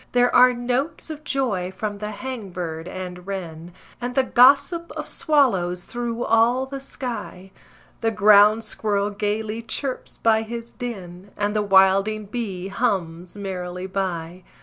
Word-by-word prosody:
There 245 Hz, 0 st, +3 dB
are 250 Hz, 0 st, +8 dB
notes 250 Hz, +7 st, -2 dB
of 305 Hz, 0 st, -8 dB
joy 225 Hz, -12 st, -1 dB
from 205 Hz, +1 st, -4 dB
the 210 Hz, 0 st, -4 dB
hang 230 Hz, -1 st, -6 dB
bird 165 Hz, -2 st, -5 dB
and 180 Hz, -1 st, -7 dB
wren, 175 Hz, -3 st, -6 dB, 0.3 s
And 245 Hz, +1 st, -4 dB
the 265 Hz, -, +4 dB
gossip 275 Hz, +7 st, +4 dB
of -, -, -4 dB
swallows 190 Hz, -, +1 dB
through 240 Hz, 0 st, -3 dB
all 235 Hz, +3 st, +3 dB
the 275 Hz, +1 st, -6 dB
sky; 240 Hz, -8 st, -7 dB, 0.5 s
The 225 Hz, -, +1 dB
ground 210 Hz, +1 st, +6 dB
squirrel 205 Hz, -1 st, -1 dB
gaily 215 Hz, +2 st, -2 dB
chirps 255 Hz, +3 st, -4 dB
by 220 Hz, -1 st, +3 dB
his 235 Hz, +1 st, -7 dB
den, 195 Hz, -6 st, -7 dB
And 205 Hz, +1 st, -1 dB
the 210 Hz, -, +2 dB
wilding 195 Hz, +2 st, +4 dB
bee 195 Hz, -4 st, -4 dB
hums 185 Hz, -5 st, -2 dB
merrily 180 Hz, -2 st, -5 dB
by. 185 Hz, -2 st, -4 dB
210 Hz, 145 wpm, -23 LUFS, 185-245 Hz, 0.5 s, are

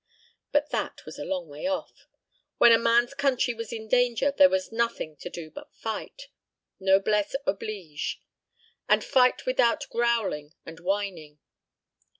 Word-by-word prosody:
But 290 Hz, 0 st, +1 dB
that -, -, -3 dB
was -, -, -9 dB
a -, -, -4 dB
long 180 Hz, -3 st, -3 dB
way 145 Hz, -, -5 dB
off. 285 Hz, -1 st, -4 dB, 0.5 s
When 240 Hz, -, +7 dB
a 230 Hz, -, +6 dB
man's 235 Hz, +2 st, +3 dB
country 275 Hz, -3 st, +1 dB
was 230 Hz, -2 st, -7 dB
in 220 Hz, -1 st, -6 dB
danger 245 Hz, +3 st, +2 dB
there 280 Hz, 0 st, +6 dB
was 285 Hz, -2 st, -1 dB
nothing 230 Hz, -9 st, -2 dB
to 175 Hz, -, -7 dB
do 165 Hz, -3 st, -8 dB
but 295 Hz, +1 st, -11 dB
fight. -, -, -6 dB, 0.5 s
Noblesse 195 Hz, +3 st, +2 dB
oblige. 190 Hz, -7 st, -4 dB, 0.7 s
And -, -, +4 dB
fight 255 Hz, -2 st, +3 dB
without 250 Hz, -2 st, +2 dB
growling 220 Hz, -11 st, 0 dB
and 165 Hz, 0 st, -10 dB
whining. 180 Hz, -5 st, -3 dB
230 Hz, 145 wpm, -27 LUFS, 190-255 Hz, 0.7 s, When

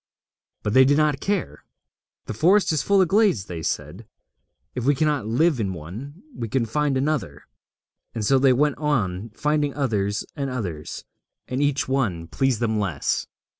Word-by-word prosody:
But 105 Hz, -, -1 dB
they 130 Hz, +1 st, +7 dB
did 145 Hz, +2 st, +3 dB
not 150 Hz, -2 st, +2 dB
care. 200 Hz, +2 st, -2 dB, 0.6 s
'The -, -, -5 dB
forest 180 Hz, -, +3 dB
is 155 Hz, -, +1 dB
full 200 Hz, -1 st, +4 dB
of -, -, 0 dB
glades,' 195 Hz, -, +3 dB
they 85 Hz, -4 st, -6 dB
said; -, -, -4 dB, 0.7 s
'if 125 Hz, -, -4 dB
we 140 Hz, +3 st, +3 dB
cannot 150 Hz, -6 st, 0 dB
live 140 Hz, +5 st, +2 dB
in 100 Hz, -4 st, -1 dB
one, 115 Hz, -, -9 dB
we 115 Hz, -, -5 dB
can 125 Hz, 0 st, +1 dB
find 140 Hz, +4 st, 0 dB
another.' 130 Hz, -, -2 dB, 0.7 s
And 110 Hz, -2 st, -2 dB
so 135 Hz, +4 st, +4 dB
they 135 Hz, 0 st, +5 dB
went 140 Hz, 0 st, +2 dB
on 115 Hz, -9 st, -1 dB
finding 150 Hz, -1 st, 0 dB
others 105 Hz, -7 st, -1 dB
and 140 Hz, -3 st, -3 dB
others, 90 Hz, -12 st, -5 dB, 0.4 s
and 130 Hz, +2 st, -2 dB
each 145 Hz, 0 st, +1 dB
one 110 Hz, -11 st, -1 dB
pleased 130 Hz, +5 st, 0 dB
them 110 Hz, -2 st, +1 dB
less. 90 Hz, -9 st, -1 dB
130 Hz, 170 wpm, -23 LUFS, 105-150 Hz, 0.7 s, they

